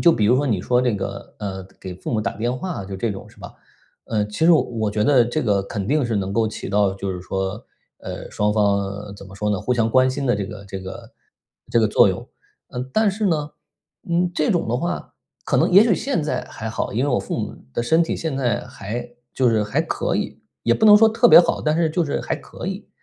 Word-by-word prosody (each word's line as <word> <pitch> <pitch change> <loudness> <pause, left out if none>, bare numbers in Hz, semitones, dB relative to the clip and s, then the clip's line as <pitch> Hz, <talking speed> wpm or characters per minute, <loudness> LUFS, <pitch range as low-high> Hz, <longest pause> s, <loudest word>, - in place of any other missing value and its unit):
就 170 - +7
比 110 - +1
如 120 +5 +4
说 145 +2 +1
你 110 -8 +1
说 125 +6 +2
这 125 -3 +1
个， 100 0 -6
呃， 95 -3 -5
给 95 -1 -7
父 90 - -6
母 110 - +1
打 - - -3
电 120 +4 -1
话 175 - -4
就 95 0 -6
这 115 +4 -1
种 95 - -8
是 - - -21
吧， - - -10 0.5
呃， 105 -2 0
其 105 +10 -2
实 170 - +7
我 160 - +6
我 110 -3 -2
觉 105 0 0
得 125 +1 +5
这 120 +6 -2
个 100 -5 +1
肯 100 -1 -4
定 150 0 +2
是 115 - -1
能 100 -1 -2
够 115 +1 +2
起 110 - -6
到 100 -1 +2
就 100 0 -4
是 90 - -6
说， 95 +4 -4 0.3
呃， - - -7
双 105 0 0
方 100 -1 0
怎 100 - -11
么 95 - -13
说 105 +1 -1
呢， 100 -3 0
互 125 - 0
相 115 -2 +1
关 130 +2 +4
心 135 +2 -3
的 120 - +2
这 100 - -2
个 105 -1 -9
这 95 -1 -6
个 95 0 -9 0.6
这 115 - +4
个 110 - +3
作 - - +5
用。 - - -4 0.4
呃， 125 - -4
但 220 -1 +3
是 210 +2 -1
呢， 155 -4 0 0.6
嗯， 175 +1 +2
这 155 - +1
种 175 - +1
的 120 - +1
话， 175 +6 -4 0.3
可 - - +1
能 - - +3
也 195 +4 +8
许 225 -5 +3
现 275 +1 -1
在 150 - -2
还 110 - -6
好， 110 - -3
因 120 +6 0
为 - - 0
我 125 - +2
父 - - -4
母 - - -4 0.2
的 - - -1
身 160 +7 +3
体 165 - -2
现 160 -4 -3
在 120 -6 +1
还 120 +5 -6 0.3
就 130 -2 +3
是 110 -2 +2
还 105 - 0
可 - - -1
以， - - -4 0.2
也 115 - +4
不 - - +1
能 210 -1 +9
说 220 +1 +6
特 230 +2 +4
别 - - +10
好， - - -1
但 155 0 +1
是 165 -1 +2
就 170 +2 +1
是 145 - -2
还 - - -2
可 - - -9
以。 195 +2 -5
115 Hz, 275 characters per minute, -22 LUFS, 100-155 Hz, 0.6 s, 别